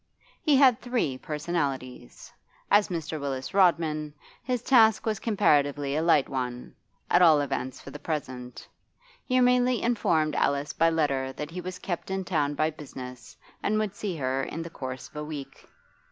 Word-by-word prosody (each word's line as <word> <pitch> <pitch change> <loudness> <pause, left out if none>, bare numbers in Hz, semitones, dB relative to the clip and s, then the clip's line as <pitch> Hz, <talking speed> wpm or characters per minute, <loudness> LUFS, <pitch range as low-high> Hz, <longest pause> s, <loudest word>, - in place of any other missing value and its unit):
He 300 -3 +3
had 260 -3 +5
three 240 - -1
personalities. 145 - -4 0.4
As 205 0 +5
Mr. 160 -4 -4
Willis 135 -2 -4
Rodman 160 -5 +2 0.3
his 245 -1 -2
task 225 -5 +5
was 215 -2 -1
comparatively 145 - +2
a 155 - +1
light 160 -4 +4
one, 125 -2 -4 0.3
at 175 - +4
all 160 -4 +7
events 135 -2 -3
for 140 - -11
the 145 - -9
present. 130 -5 -5 0.6
He 255 0 +2
merely 250 0 +3
informed 175 -10 +1
Alice 140 +1 0
by 165 0 +3
letter 140 -5 0
that 150 +3 -6
he 180 +2 -5
was 180 +1 -6
kept 175 -1 -5
in 190 0 -2
town 145 -5 0
by 155 +2 +1
business 130 -4 -10 0.2
and 215 +1 +1
would 215 -2 -1
see 200 -4 -4
her 135 -2 -1
in 165 +4 -4
the 165 - -9
course 130 -3 -6
of - - -14
a 150 - -3
week. 145 -3 -8
155 Hz, 170 wpm, -27 LUFS, 140-195 Hz, 0.6 s, all